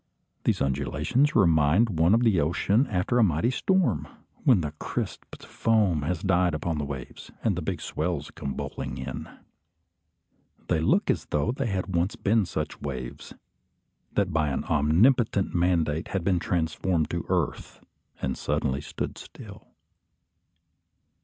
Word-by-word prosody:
These - - +2
undulations 75 - 0
remind 85 +2 +4
one 85 +6 +5
of 115 - +2
the 110 -8 +3
ocean 100 - +2
after 105 +5 0
a - - +6
mighty 85 - +2
storm, 190 +6 +1 0.4
when 125 - +5
the 75 -2 -3
crisped - - -5
foam 105 -8 +1
has 80 +3 -2
died 90 -3 +2
upon 80 0 -2
the 75 - -2
waves, 70 -3 -8
and - - +2
the - - -3
big - - -3
swell 85 0 -2
comes 70 - -5
bowling 65 -1 -5
in. 65 -1 -6 1.4
They - - +2
look 80 - +2
as - - -3
though 75 +10 0
they 130 0 -2
had 95 -2 -2
once 85 +4 +1
been 105 -1 +1
such 75 -3 -4
waves, 65 -4 -6 0.8
that 95 -4 0
by 80 -1 +2
an 70 - -1
omnipotent 95 - +3
mandate 85 -2 +1
had 95 -3 -2
been 90 -1 +2
transformed 85 0 0
to - - -2
earth - - -2 0.4
and 65 -1 0
suddenly 70 -2 -1
stood - - -5
still. - - -12
85 Hz, 145 wpm, -26 LUFS, 75-100 Hz, 1.4 s, a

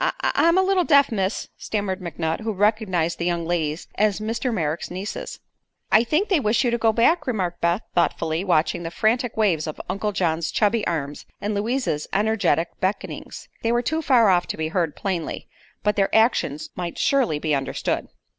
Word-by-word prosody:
"I - - +1
I'm 335 +2 +3
a 380 - +5
little 380 -1 +2
deaf, 280 -5 +4
miss," 195 -1 -2
stammered 200 -3 -3
McNutt, 160 -2 -3
who 220 0 -3
recognized 195 -5 +1
the 170 - -1
young 170 -1 -1
ladies 160 -2 -2
as 210 -1 +1
Mr. 225 +4 -2
Merrick's 165 -6 -2
nieces. 190 +4 -6 0.5
"I 220 - +6
think 310 - +1
they 370 -6 +3
wish 225 -1 +2
you 240 - +1
to 235 - +1
go 225 0 +4
back," 245 +11 +2
remarked 185 -8 -2
Beth, 170 +5 +1
thoughtfully 165 -1 0
watching 170 -3 +1
the 165 - -4
frantic 225 +7 0
waves 175 -8 +2
of 155 - -6
Uncle 195 +3 -2
John's 170 -4 0
chubby 215 +1 +1
arms 145 -4 -3
and 210 +1 -2
Louise's 210 - -1
energetic 200 -5 +1
beckonings. 190 +2 -4
They 230 - +1
were 240 +1 +1
too 315 +6 -1
far 245 -8 +4
off 175 -2 +3
to - - -4
be 160 0 -2
heard 165 -3 -1
plainly, 180 -5 -3 0.4
but 210 0 +2
their 195 -1 +2
actions 220 - +2
might 175 -2 -5
surely 260 - +2
be 155 0 -1
understood. 135 -1 -1
200 Hz, 185 wpm, -23 LUFS, 170-230 Hz, 0.5 s, I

